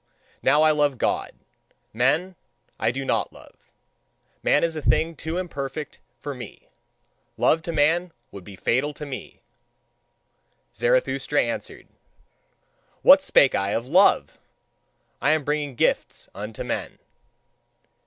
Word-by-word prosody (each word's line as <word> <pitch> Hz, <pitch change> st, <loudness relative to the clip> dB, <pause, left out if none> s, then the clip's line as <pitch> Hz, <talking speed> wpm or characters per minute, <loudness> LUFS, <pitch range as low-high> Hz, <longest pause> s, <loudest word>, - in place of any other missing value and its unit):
Now 150 Hz, +2 st, +4 dB
I 155 Hz, -, +5 dB
love 145 Hz, -3 st, +1 dB
God: -, -, -1 dB, 0.6 s
men, 150 Hz, +11 st, +1 dB, 0.4 s
I 110 Hz, -, +1 dB
do 135 Hz, +3 st, -4 dB
not -, -, 0 dB
love. -, -, -19 dB, 0.7 s
Man 145 Hz, -, +2 dB
is 165 Hz, -1 st, 0 dB
a 155 Hz, -, -4 dB
thing 155 Hz, +6 st, +1 dB
too 160 Hz, +3 st, -5 dB
imperfect 150 Hz, -4 st, -5 dB, 0.2 s
for 145 Hz, +4 st, -6 dB
me. 120 Hz, -5 st, -11 dB, 0.7 s
Love 160 Hz, -, +3 dB
to 170 Hz, -, -5 dB
man 165 Hz, +3 st, +2 dB, 0.2 s
would 100 Hz, -, -10 dB
be 100 Hz, +1 st, -11 dB
fatal 135 Hz, +9 st, 0 dB
to 150 Hz, -, -7 dB
me." 135 Hz, -3 st, -8 dB, 1.3 s
Zarathustra -, -, +1 dB
answered: -, -, -6 dB, 1.2 s
"What 285 Hz, +1 st, +8 dB
spake 140 Hz, -, +4 dB
I 100 Hz, +1 st, 0 dB
of 115 Hz, -, -2 dB
love! 180 Hz, +9 st, +3 dB, 0.8 s
I 150 Hz, -, +3 dB
am 155 Hz, -2 st, 0 dB
bringing 145 Hz, -2 st, -2 dB
gifts -, -, -1 dB
unto -, -, -6 dB
men." -, -, -4 dB
150 Hz, 125 wpm, -24 LUFS, 130-165 Hz, 1.3 s, What